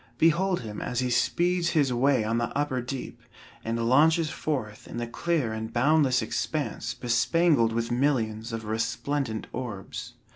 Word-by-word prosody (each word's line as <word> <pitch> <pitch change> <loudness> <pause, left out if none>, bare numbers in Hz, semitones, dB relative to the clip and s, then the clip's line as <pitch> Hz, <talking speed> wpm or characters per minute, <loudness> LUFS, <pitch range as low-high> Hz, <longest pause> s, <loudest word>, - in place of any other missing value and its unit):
Behold 175 +4 +3
him 105 -3 -6
as 125 -1 -2
he 125 -1 0
speeds 175 +7 +2
his 135 -4 +3
way 130 -1 +3
on 115 +2 0
the 120 - 0
upper 145 -3 0
deep, 130 +2 -6 0.4
and 115 0 -1
launches 155 +4 +4
forth 115 -9 -4
in - - -7
the 120 - -2
clear 135 -1 -1
and 110 0 -5
boundless 130 +1 +3
expanse - - -3
bespangled 120 +2 +2
with 115 +1 -2
millions 120 -4 0
of 115 -1 -5
resplendent 115 +2 -2
orbs. 120 0 -6
125 Hz, 150 wpm, -27 LUFS, 115-145 Hz, 0.4 s, launches